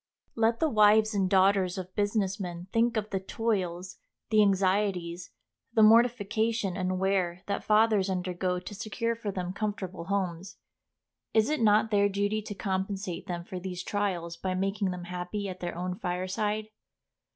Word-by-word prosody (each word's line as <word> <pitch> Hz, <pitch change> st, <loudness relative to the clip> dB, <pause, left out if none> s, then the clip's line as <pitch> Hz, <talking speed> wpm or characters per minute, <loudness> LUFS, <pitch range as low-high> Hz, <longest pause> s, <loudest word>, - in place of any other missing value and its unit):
Let 225 Hz, 0 st, +1 dB
the 320 Hz, -, +3 dB
wives 215 Hz, -3 st, +5 dB
and 195 Hz, -2 st, +1 dB
daughters 190 Hz, -1 st, +3 dB
of 185 Hz, 0 st, -6 dB
business 205 Hz, -1 st, 0 dB
men 175 Hz, -2 st, -5 dB
think 230 Hz, 0 st, +2 dB
of 215 Hz, 0 st, -3 dB
the 195 Hz, -, 0 dB
toils, 190 Hz, -3 st, -2 dB, 0.3 s
the 215 Hz, -1 st, +6 dB
anxieties, 190 Hz, -3 st, +1 dB, 0.4 s
the 220 Hz, -, +5 dB
mortification 220 Hz, -2 st, +3 dB
and 185 Hz, 0 st, -1 dB
wear 185 Hz, -2 st, 0 dB
that 200 Hz, -, -2 dB
fathers 215 Hz, -2 st, +3 dB
undergo 180 Hz, 0 st, -1 dB
to 185 Hz, +3 st, -9 dB
secure 225 Hz, +3 st, -2 dB
for 225 Hz, -2 st, -5 dB
them 180 Hz, -1 st, -4 dB
comfortable 195 Hz, -4 st, -4 dB
homes. 190 Hz, -1 st, -3 dB, 0.8 s
Is 220 Hz, +5 st, +4 dB
it 305 Hz, -, 0 dB
not 220 Hz, 0 st, +4 dB
their 205 Hz, -1 st, +4 dB
duty 205 Hz, +2 st, 0 dB
to 205 Hz, -1 st, -7 dB
compensate 190 Hz, -2 st, -3 dB
them 175 Hz, -1 st, -4 dB
for 185 Hz, -, -6 dB
these 180 Hz, -1 st, -5 dB
trials 180 Hz, -5 st, -2 dB
by 185 Hz, -1 st, -2 dB
making 195 Hz, +1 st, 0 dB
them 180 Hz, -1 st, -5 dB
happy 180 Hz, +3 st, -4 dB
at 185 Hz, -1 st, -6 dB
their 175 Hz, -1 st, -4 dB
own 180 Hz, +1 st, -2 dB
fireside? 195 Hz, +4 st, -2 dB
195 Hz, 160 wpm, -29 LUFS, 185-215 Hz, 0.8 s, the